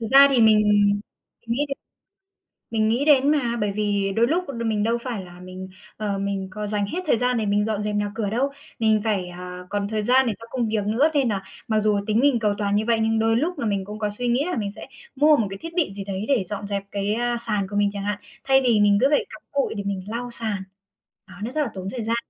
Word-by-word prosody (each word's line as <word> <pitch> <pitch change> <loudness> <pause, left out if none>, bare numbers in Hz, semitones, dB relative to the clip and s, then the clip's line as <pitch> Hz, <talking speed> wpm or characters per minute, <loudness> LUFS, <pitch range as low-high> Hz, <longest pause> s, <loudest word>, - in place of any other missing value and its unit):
Thực 225 - -3
ra 275 +1 +9
thì 260 -3 +3
mình 220 -1 +6 0.9
nghĩ 240 +6 0
đến 275 - -3 1.0
mình 220 -1 +2
nghĩ 245 +6 +1
đến 285 -1 +5
mà, 245 -6 +1
bởi 205 -1 +1
vì 200 -1 0
đôi 230 +1 +4
lúc 340 +6 +1
đ 235 -4 -4
mình 215 -2 +1
đâu 230 +2 +1
phải 230 -7 -4
là 175 0 -13
mình, 185 +1 -8 0.3
ờ, 205 -2 -2
mình 195 -1 -2
có 210 +2 -4
dành 205 -1 0
hết 345 - -3
thời 265 - +4
gian 250 +1 +1
để 220 - 0
mình 205 0 +2
dọn 215 -1 -1
dẹp 210 0 -2
nhà 205 0 -1
cửa 220 -3 -1
đâu. 250 +6 +1 0.3
Mình 220 -2 +3
phải, 200 -5 0
à, 180 0 -8
còn 200 0 -1
thời 215 0 -2
gian 260 +3 +4
để 225 - +1
cho 230 - -10
công 240 -3 -1
việc 215 -2 0
nữa, 240 +9 +3
nên 275 -5 +2
là 195 -2 -2 0.2
mặc 220 -1 +2
dù 210 -1 +2
tính 215 +1 +2
mình 270 -2 +3
cầu 210 -2 +1
toàn 200 -1 0
như 215 +1 +1
vậy 230 -1 +3
nhưng 225 0 +2
đôi 225 0 +3
lúc 320 +5 -1
là 235 - -2
mình 200 -3 -1
cũng 210 +1 -7
có 210 -1 0
suy 245 - -2
nghĩ 245 +5 +2
là 360 - -2
mình 205 -3 -2
sẽ - - -9 0.3
mua 300 +2 +6
một 220 - +1
cái 195 - -6
thiết 330 +9 -8
bị 330 - +1
gì 200 - -5
đấy 195 +1 -4
để 255 -9 +2
dọn 205 -1 -4
dẹp 200 -1 -2
cái, 200 +1 -1
a, 240 +1 0
sàn 205 -3 0
của 205 - -6
mình 205 0 +3
chẳng 200 -1 -4
hạn, 205 0 -2 0.2
thay 270 0 +4
vì 240 -4 +3
mình 205 -1 +5
cứ 265 - +6
phải 295 - +2
cặm 215 - -11
cụi 280 -1 0
để 200 - -3
mình 200 -2 -3
lau 240 +3 -4
sàn. 220 -5 -3 0.6
Đó, - - -13
nó 230 - -3
rất 305 +3 0
là 285 - 0
tốn 190 0 -5
thời 245 -3 -4
gian. 230 +2 0
215 Hz, 275 wpm, -23 LUFS, 205-245 Hz, 1.0 s, ra